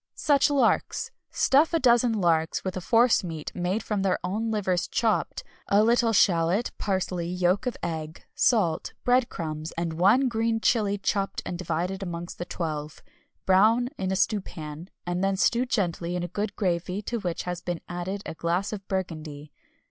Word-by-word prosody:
Such 285 -1 +3
Larks! 285 -2 +1 0.2
Stuff 300 +5 +3
a - - +3
dozen 240 -2 +4
larks 165 -6 +1
with 185 -1 -3
a 185 - -3
force 230 +4 +4
meat 160 -4 -5
made 180 +5 -1
from 210 -2 -1
their 190 -2 +1
own 210 +5 -2
livers 190 -5 0
chopped, 225 -3 0 0.2
a 205 +1 +4
little 235 0 +3
shallot, 180 +1 +3
parsley, 185 -3 -1
yolk 180 +5 +1
of 250 - -2
egg, 160 -1 -5
salt, 180 -10 +1
bread 250 0 +3
crumbs, 155 -1 -5
and 165 -1 -3
one 205 +11 +4
green 225 -1 0
chili 210 -3 +2
chopped 195 0 -1
and 180 - -4
divided 180 +2 -2
amongst 175 -2 -6
the 175 - -3
twelve. 155 -4 -5 0.4
Brown 220 +6 +4
in 190 0 -1
a - - +1
stewpan, 170 -5 -2 0.2
and 175 +1 -2
then 195 0 +1
stew 240 +6 +2
gently 175 -6 -1
in 175 - -2
a - - -2
good 205 +3 -3
gravy 180 +1 -1
to 235 +3 -3
which 175 -4 -3
has 180 -1 -4
been 175 -2 -3
added 185 +3 -4
a - - -5
glass 175 +6 -1
of 195 -2 -7
burgundy. 155 -6 -4
190 Hz, 170 wpm, -26 LUFS, 170-220 Hz, 0.4 s, dozen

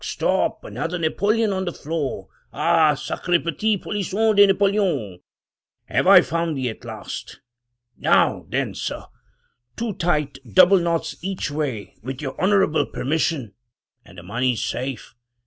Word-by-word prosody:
Stop! - - 0
another 175 +2 -4
napoleon 205 +6 +1
on 190 0 -2
the 175 - -2
floor! 155 -4 -4 0.2
Ah! 155 -2 +3
sacre 160 +4 -1
petit 200 +7 0
polisson 210 +3 0
de 200 0 +7
Napoleon! 195 - +1 0.7
have - - 0
I - - +9
found 165 -2 -2
thee 130 -2 -1
at - - -14
last? - - -8 0.6
Now - - +2
then, - - -1
sir - - -5 0.4
— 120 0 -47
two 230 -2 -2
tight 150 -6 -1 0.2
double 195 +1 +7
knots 170 -1 -1
each 190 -5 -3
way 140 -8 -4
with 130 +3 -6
your 135 -3 -4
honorable 190 -4 +3
permission, 140 - -1 0.5
and 90 - -17
the 85 - -10
money's 115 +5 -1
safe. 130 0 -4
165 Hz, 140 wpm, -22 LUFS, 135-195 Hz, 0.7 s, I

